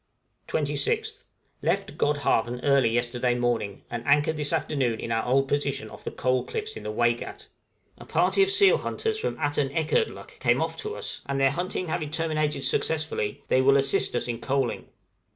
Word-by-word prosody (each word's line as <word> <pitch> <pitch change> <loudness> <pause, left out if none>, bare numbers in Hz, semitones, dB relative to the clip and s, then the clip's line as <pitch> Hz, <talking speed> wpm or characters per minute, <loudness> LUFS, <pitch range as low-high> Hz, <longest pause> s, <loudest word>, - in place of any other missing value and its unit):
{COALING.} 150 - 0
26th. 145 -1 -1 0.4
Left - - -1
Godhavn 125 -5 +1
early 140 -4 +4
yesterday 120 +1 0
morning, 120 -5 -1
and 120 -1 -4
anchored 145 +2 +3
this 150 -1 -1
afternoon 135 -8 0
in 115 - -5
our 115 0 +1
old 135 +2 +2
position 145 0 -2
off - - -12
the - - -3
Coal 130 0 0
Cliffs 435 - -5
in - - -7
the 105 - -4
Waigat; 120 +2 -1 0.5
a - - -11
party 395 - +2
of 390 - +4
seal 395 0 +5
hunters 440 -1 -2
from 465 - -2
Atanekerdluk 145 - -1
came - - +2
off - - -1
to 430 0 -4
us, - - -4
and 140 0 -1
their 135 0 +4
hunting 180 +3 -3
having 155 -2 -2
terminated 155 -3 -1
successfully, 155 -12 0
they 130 - +3
will 135 +1 +5
assist 135 -2 +2
us 120 - 0
in 120 -1 -4
coaling. 135 -2 -1
140 Hz, 175 wpm, -26 LUFS, 120-155 Hz, 0.5 s, seal